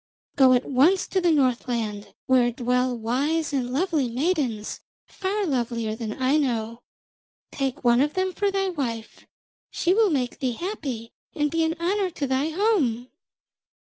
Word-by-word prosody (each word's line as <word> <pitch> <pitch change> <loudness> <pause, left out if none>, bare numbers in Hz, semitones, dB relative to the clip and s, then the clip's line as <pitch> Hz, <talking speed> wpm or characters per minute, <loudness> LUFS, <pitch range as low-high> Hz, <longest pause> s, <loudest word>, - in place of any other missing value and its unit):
Go 260 -2 +6
at 250 0 +2
once 295 +9 +3
to 380 - +1
the 350 - +3
Northland, 240 -7 -1
where 250 -2 +3
dwell 250 +1 0
wise 285 +8 -1
and 250 -3 -1
lovely 295 -3 0
maidens, 255 - -1 0.3
far 400 +1 -2
lovelier 235 -6 -1
than 220 -2 -4
Aino. 250 -4 0 0.7
Take 270 0 -3
one 240 0 +4
of 295 +4 0
them 375 0 0
for 405 +1 0
thy 390 -1 0
wife; 240 -10 -5 0.4
she 350 - +1
will 435 0 +4
make 255 -6 -1
thee 255 -3 -1
happy 265 - -5 0.2
and 295 -2 0
be 330 0 +1
an 320 0 0
honour 380 +3 0
to 300 -4 -4
thy 265 +3 0
home.' 310 - +1
270 Hz, 150 wpm, -25 LUFS, 240-335 Hz, 0.7 s, Go